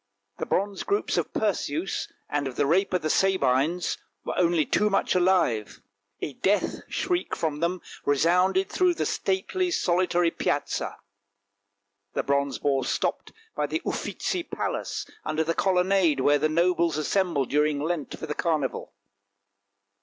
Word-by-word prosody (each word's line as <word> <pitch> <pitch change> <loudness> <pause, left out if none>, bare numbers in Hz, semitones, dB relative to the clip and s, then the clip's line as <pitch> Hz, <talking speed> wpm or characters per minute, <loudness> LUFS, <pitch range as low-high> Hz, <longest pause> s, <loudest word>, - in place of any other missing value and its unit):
The - - -3
bronze 200 +1 0
groups 405 +1 0
of - - -1
Perseus, 185 -4 -1 0.2
and 145 -1 -1
of 130 - -6
the - - +2
Rape 185 +7 +2
of 180 -3 0
the 155 - 0
Sabines, 170 -2 +2 0.3
were - - -2
only 170 -3 +3
too 210 - +2
much 195 - +1
alive; 180 - +2 0.4
a 145 - -3
death 200 +9 +1
shriek 360 -1 -1
from 155 -3 -2
them 170 +2 -1 0.2
resounded 180 +6 +3
through 360 - +2
the - - -1
stately, 275 - 0
solitary, 175 - +2
Piazza. - - -2 1.2
The - - 0
bronze 140 -1 0
boar 135 -2 +1
stopped - - -2 0.2
by - - 0
the - - -3
Uffizi 365 - -2
palace - - -3 0.2
under 155 +1 0
the 165 +1 0
colonnade 185 -4 +2
where 145 +2 +4
the 155 +2 +2
nobles 170 0 +2
assemble 165 -2 +1
during 150 +2 +1
Lent 155 0 -3
for - - -6
the 150 - -3
carnival. 155 -5 -2
170 Hz, 145 wpm, -26 LUFS, 145-190 Hz, 1.2 s, where